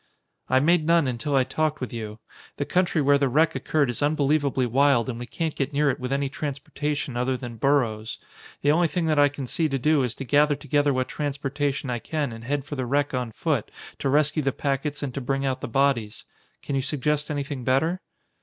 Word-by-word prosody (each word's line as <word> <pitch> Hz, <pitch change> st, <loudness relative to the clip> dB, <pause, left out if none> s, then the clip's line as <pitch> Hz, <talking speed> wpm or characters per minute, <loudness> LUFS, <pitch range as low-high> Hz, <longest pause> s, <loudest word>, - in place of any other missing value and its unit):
"I 130 Hz, -, +4 dB
made 160 Hz, +2 st, +3 dB
none 170 Hz, -2 st, +4 dB
until 130 Hz, +3 st, -1 dB
I 130 Hz, -, +5 dB
talked 150 Hz, +3 st, -1 dB
with 130 Hz, -, -5 dB
you. 110 Hz, -2 st, -5 dB, 0.4 s
The -, -, -1 dB
country 180 Hz, -4 st, +1 dB
where 140 Hz, +1 st, +4 dB
the 140 Hz, -2 st, +2 dB
wreck 155 Hz, +6 st, +3 dB
occurred 150 Hz, -3 st, +1 dB
is 120 Hz, -2 st, -4 dB
unbelievably 145 Hz, -2 st, +2 dB
wild 135 Hz, 0 st, +3 dB
and 120 Hz, -2 st, -4 dB
we 120 Hz, -, -6 dB
can't 160 Hz, +2 st, -2 dB
get 140 Hz, +1 st, -2 dB
near 145 Hz, 0 st, +3 dB
it -, -, -6 dB
with 125 Hz, 0 st, -4 dB
any 140 Hz, 0 st, +1 dB
transportation 145 Hz, 0 st, -3 dB
other 125 Hz, +1 st, 0 dB
than 120 Hz, -3 st, -7 dB
burros. 115 Hz, -4 st, +1 dB, 0.5 s
The 145 Hz, -, +5 dB
only 170 Hz, +2 st, +3 dB
thing 170 Hz, +1 st, -1 dB
that 155 Hz, -2 st, +2 dB
I 145 Hz, 0 st, +6 dB
can 140 Hz, -1 st, -6 dB
see 155 Hz, +5 st, 0 dB
to 135 Hz, -, 0 dB
do 150 Hz, +2 st, +3 dB
is 125 Hz, -2 st, -1 dB
to 135 Hz, -, -6 dB
gather 145 Hz, +2 st, +4 dB
together 145 Hz, 0 st, +1 dB
what 130 Hz, -1 st, 0 dB
transportation 140 Hz, -1 st, -2 dB
I 120 Hz, -, -2 dB
can 145 Hz, +2 st, -2 dB
and 115 Hz, 0 st, -9 dB
head 140 Hz, +1 st, -1 dB
for 145 Hz, -, -5 dB
the 130 Hz, -2 st, -3 dB
wreck 145 Hz, +2 st, +1 dB
on 125 Hz, -3 st, -2 dB
foot -, -, -1 dB, 0.3 s
to 135 Hz, -, 0 dB
rescue 150 Hz, +2 st, +2 dB
the 135 Hz, -1 st, +1 dB
packets 140 Hz, +2 st, -2 dB
and 135 Hz, -3 st, -3 dB
to 140 Hz, -, -4 dB
bring 135 Hz, +2 st, -1 dB
out 130 Hz, -1 st, -1 dB
the -, -, -3 dB
bodies. 120 Hz, -4 st, 0 dB, 0.4 s
Can -, -, -4 dB
you 135 Hz, -, +1 dB
suggest 150 Hz, +2 st, -1 dB
anything 145 Hz, -3 st, -3 dB
better?" 160 Hz, +9 st, +1 dB
140 Hz, 220 wpm, -25 LUFS, 130-150 Hz, 0.5 s, I